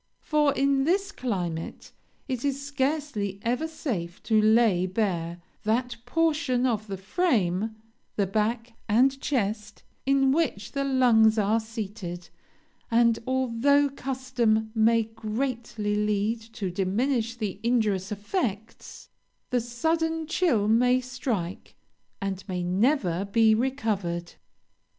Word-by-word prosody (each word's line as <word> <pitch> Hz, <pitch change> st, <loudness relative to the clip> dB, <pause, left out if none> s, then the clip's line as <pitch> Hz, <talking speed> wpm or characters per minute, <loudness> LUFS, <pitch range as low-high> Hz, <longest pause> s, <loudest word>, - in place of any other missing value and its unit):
For, 300 Hz, -2 st, +3 dB
in 275 Hz, 0 st, +2 dB
this 390 Hz, +6 st, +1 dB
climate, 180 Hz, -, -4 dB, 0.4 s
it 255 Hz, -3 st, -3 dB
is 280 Hz, -1 st, 0 dB
scarcely 275 Hz, -8 st, -2 dB
ever 250 Hz, +7 st, 0 dB
safe 210 Hz, -, -4 dB
to 220 Hz, -2 st, +3 dB
lay 215 Hz, -4 st, +4 dB
bare 175 Hz, -4 st, -1 dB, 0.2 s
that 240 Hz, +3 st, 0 dB
portion 300 Hz, -6 st, +1 dB
of 220 Hz, -4 st, 0 dB
the 195 Hz, -1 st, -4 dB
frame, 215 Hz, -, 0 dB, 0.4 s
the 200 Hz, -, +1 dB
back 225 Hz, +4 st, -1 dB, 0.2 s
and 265 Hz, +5 st, +3 dB
chest 210 Hz, -5 st, -2 dB, 0.2 s
in 270 Hz, -1 st, +4 dB
which 275 Hz, -10 st, 0 dB
the 275 Hz, -1 st, -1 dB
lungs 240 Hz, -5 st, +4 dB
are 215 Hz, +2 st, +2 dB
seated; 205 Hz, -6 st, -6 dB, 0.6 s
and, 230 Hz, 0 st, +3 dB
although 260 Hz, +3 st, +2 dB
custom 250 Hz, -5 st, -1 dB
may 225 Hz, 0 st, +4 dB
greatly 225 Hz, -1 st, -3 dB
lead 210 Hz, +2 st, 0 dB
to 195 Hz, -4 st, -3 dB
diminish 225 Hz, +6 st, 0 dB
the 210 Hz, -5 st, -4 dB
injurious 215 Hz, -5 st, +1 dB
effects, 210 Hz, -, -4 dB, 0.4 s
the 250 Hz, -1 st, +2 dB
sudden 320 Hz, +7 st, -1 dB
chill 305 Hz, -, +1 dB
may 250 Hz, +3 st, +4 dB
strike, 245 Hz, -8 st, -4 dB, 0.4 s
and 195 Hz, -1 st, -3 dB
may 180 Hz, -2 st, -2 dB
never 190 Hz, -, +1 dB
be 220 Hz, +2 st, +4 dB
recovered. 215 Hz, -9 st, -1 dB
230 Hz, 115 wpm, -26 LUFS, 205-265 Hz, 0.6 s, lay